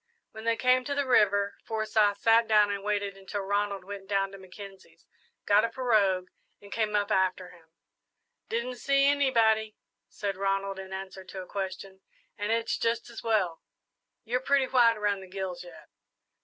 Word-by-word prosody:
When 220 0 -10
they 230 0 +2
came 255 +1 +3
to 285 - -2
the 285 0 0
river 205 -5 +3
Forsyth 215 -2 +1
sat 230 0 +4
down 210 -1 +4
and 200 -1 -4
waited 205 -1 -1
until 195 +1 -5
Ronald 200 0 -1
went 195 0 -8
down 195 -1 0
to 195 - -11
Mackenzie's, 190 +1 -13 0.4
got 205 +1 +4
a 230 - +1
pirogue, 215 -7 +1 0.3
and 200 0 -15
came 215 -1 -1
up 205 +1 0
after 190 -2 0
him. 165 -2 -20 0.8
"Didn't 240 +2 -3
see 275 +3 +2
anybody," 230 -6 +2 0.3
said 200 -2 -4
Ronald, 195 0 -1
in 190 0 -9
answer 190 0 -7
to 185 0 -7
a - - -12
question, 190 0 -6 0.3
"and 205 0 -3
it's 230 0 0
just 230 +1 -1
as 235 - -8
well. 195 -7 0 0.6
You're 245 +3 -1
pretty 275 0 +2
white 240 -3 +4
around 205 -1 0
the 190 - -11
gills 185 -2 -5
yet." 175 -2 -14
205 Hz, 170 wpm, -28 LUFS, 195-230 Hz, 0.8 s, sat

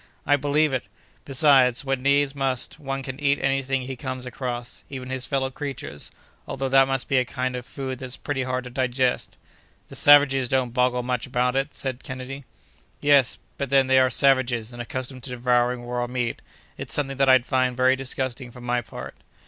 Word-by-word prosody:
"I 145 - +4
believe 145 +1 +1
it. 130 - -1 0.4
Besides, 135 -2 +4
when 135 -1 -1
needs 140 +1 +2
must, 135 +1 -2
one 135 -2 -4
can 130 +1 -6
eat 140 -1 +2
any 135 0 +1
thing 135 0 -1
he 130 +1 -5
comes 130 0 -6
across, 125 -1 -5
even 130 -2 -7
his 130 -1 -2
fellow 135 -2 -1
creatures, 135 - -6 0.4
although 135 0 -3
that 135 0 +5
must 135 -2 -1
be 135 - +3
a - - +2
kind 130 0 -3
of 125 0 -6
food 130 -2 -5
that's 130 -1 -6
pretty 145 -2 -3
hard 130 -1 -2
to 125 - -9
digest." 130 0 0 0.5
"The - - -9
savages 145 -3 +6
don't 125 -2 0
boggle 125 -1 +1
much 125 0 -2
about 125 0 0
it!" 135 +2 -1
said 130 -1 -4
Kennedy. 130 +1 -7 0.5
"Yes; 140 -4 +4 0.2
but 140 - -2
then 135 0 +4
they 130 0 +4
are 130 0 +4
savages, 125 -4 +2
and 120 - -6
accustomed 130 +1 -5
to - - -7
devouring 125 0 +1
raw 120 0 -2
meat; 125 -1 -3 0.4
it's - - -3
something 135 -2 -2
that 135 -1 +3
I'd 130 -2 +6
find 130 -2 +1
very 130 +1 +4
disgusting, 130 -1 -3
for 125 +1 -13
my 120 0 -1
part." 115 - -9
130 Hz, 195 wpm, -24 LUFS, 125-135 Hz, 0.5 s, savages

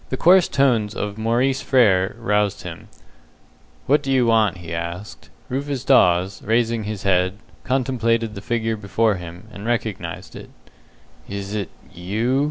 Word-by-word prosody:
The 130 - -2
coarse 180 +3 +6
tones 120 -6 +1
of 105 +1 -4
Maurice 125 +4 +1
Frere 105 -5 +3
roused 105 -3 0
him. 85 -2 -8 1.0
"What 145 +2 +3
do 135 -2 -3
you 130 -2 +3
want?" 110 -5 +3
he 85 -2 -8
asked. 85 +4 -6 0.2
Rufus 135 0 -3
Dawes, 95 -7 +3
raising 115 0 0
his 105 -2 -5
head, 95 0 +1 0.3
contemplated 115 -4 0
the 100 - -7
figure 115 0 -1
before 105 0 0
him, 90 +3 -10
and 100 - -9
recognized 105 -7 -3
it. - - -10 0.8
"Is 100 0 -5
it 100 -4 -3 0.2
you?" 110 +9 -1
110 Hz, 145 wpm, -21 LUFS, 95-120 Hz, 1.0 s, coarse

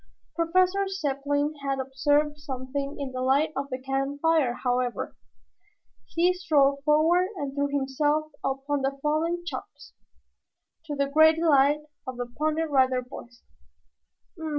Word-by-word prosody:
Professor 370 +4 +2
Zepplin 290 -4 -1
had 275 -1 -1
observed 290 +3 +1
something 275 0 -5
in 275 -2 -4
the 255 0 -4
light 275 +5 +2
of 275 +1 -3
the 255 - -3
campfire, 275 +1 0
however. 245 -1 -1 0.9
He 350 +2 +2
strode 280 -6 +2
forward 320 +5 +3
and 285 -6 -4
threw 285 0 0
himself 290 +2 0
upon 275 +1 -1
the 270 +1 -1
fallen 330 +3 0
Chops, - - -8 0.9
to 295 -2 -4
the 280 0 +1
great 315 +3 +5
delight 295 -2 +3 0.3
of 255 -1 -5
the 245 - -3
Pony 305 +6 -1
Rider 260 -4 +2
Boys. 245 -1 -12
285 Hz, 130 wpm, -26 LUFS, 270-310 Hz, 0.9 s, great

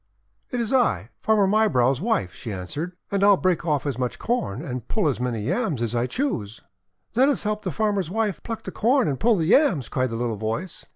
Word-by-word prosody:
" - - -46
'T 250 - -2
is 235 +1 -1
I, 115 - +2
Farmer 215 -2 +3
Mybrow's 160 - +3
wife," 190 - 0
she - - -8
an 95 -3 -4
swered. 160 - -5 0.2
"And 200 0 +1
I'll 200 -1 +6
break 175 -2 0
off 150 -3 +1
as 135 -4 -2
much 125 -1 -2
Corn 150 - -2
and 125 -4 -5
pull 210 -7 0
as 135 - 0
many 120 -4 -2
Yams 175 - -1
as 120 0 -1
I 120 +1 0
choose." 125 - -3 0.5
"Let 265 +4 +4
us 285 - 0
help 210 0 -1
the 190 - -3
farmer's 200 0 0
wife 210 -1 -1
pluck 225 -1 -6
the - - -6
Corn 250 +3 +2
and 135 -3 -1
pull 230 0 +4
the 165 -4 0
Yams!" 180 - +3
cried 130 0 0
the 115 - -4
little 115 -2 -2
voice. 115 - -4
170 Hz, 230 wpm, -24 LUFS, -, 0.5 s, I'll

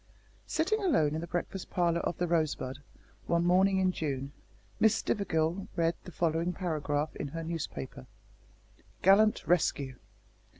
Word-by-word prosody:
Sitting 385 +7 +1
alone 160 - +3
in 160 - -2
the 170 - -5
breakfast 175 +2 -4
parlour 170 -2 +1
of 175 - -2
The 175 - 0
Rosebud, 155 -5 -1 0.5
one 170 0 +2
morning 190 +2 +4
in 185 -1 +3
June, 140 -5 -3 0.5
Miss 220 0 +5
Stivergill 175 -3 0
read 165 -1 +2
the 180 - -8
following 165 +1 0
paragraph 155 -4 -2
in - - -3
her 165 +4 -5
newspaper: 150 - -5 1.0
"GALLANT 210 +3 +5
RESCUE. 140 -6 +1
170 Hz, 135 wpm, -30 LUFS, 155-185 Hz, 1.0 s, Miss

